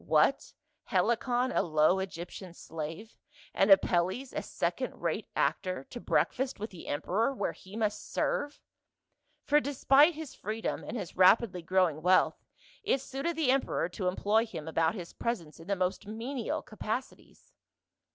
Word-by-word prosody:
What, - - +2 0.3
Helicon, 245 +2 +1
a - - +2
low 155 +2 +3
Egyptain 180 -1 -6
slave, 165 +9 -7 0.4
and 195 - +3
Apelles, 195 +6 +3
a - - -2
second - - -3
rate - - -2
actor, 185 -7 0
to 240 - -6
breakfast 265 -1 0
with 215 +2 -5
the 180 - -11
emperor 205 - 0
where - - -1
he 190 +2 -13
must 215 -2 -2
serve? 290 - -1 0.9
For 295 +1 +5
despite 285 +3 +4
his 315 -3 -7
freedom 220 +2 -4
and 240 - -5
his 190 -6 -6
rapidly 185 0 +5
growing 175 -3 +1
wealth, 185 +3 +3 0.4
it 410 -10 +1
suited 275 +6 -3
the 305 -5 +2
emperor 265 -9 0
to 180 +1 -3
employ 210 +5 +2
him 160 -8 -7
about 160 +2 +1
his 175 -4 -7
presence 170 -11 -4
in 165 - -12
the 200 - +1
most 185 +2 -2
menial 230 +3 -3
capacities. 220 +4 -6
205 Hz, 150 wpm, -30 LUFS, 180-250 Hz, 0.9 s, For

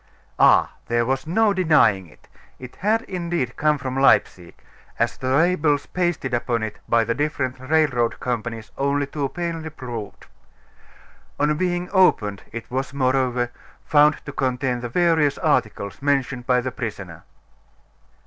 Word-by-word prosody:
Ah! - - +5 0.2
there 120 0 +1
was 135 +5 -2
no 210 +5 +3
denying 150 - +3
it. 75 - -21 0.3
It 125 -1 -11
had, 220 +4 +1
indeed, 170 -8 -3
come 150 0 +2
from 130 -1 -5
Leipsic; 95 -9 +2 0.3
as - - 0
the 130 - -6
labels 150 0 +2
pasted 175 -8 -2
upon 120 -1 -1
it 105 -1 -5
by 115 0 +4
the 115 +1 -1
different 130 -2 -2
railroad 130 -4 +1
companies 115 -2 -4
only 140 +1 +1
too 140 0 -3
plainly 165 -1 -4
proved. 120 -8 -8 1.1
On 150 +1 +2
being 175 +1 -1
opened, 110 - +3
it 115 +1 -8
was, 135 +2 -3
moreover, 130 -2 +1 0.3
found 150 0 +3
to 140 - -6
contain 130 -2 -1
the 120 0 -5
various 160 -1 +2
articles 110 -9 -1
mentioned 135 -3 -1
by 125 -1 +3
the 130 +1 -4
prisoner. 100 -9 -6
135 Hz, 140 wpm, -22 LUFS, 120-155 Hz, 1.1 s, Ah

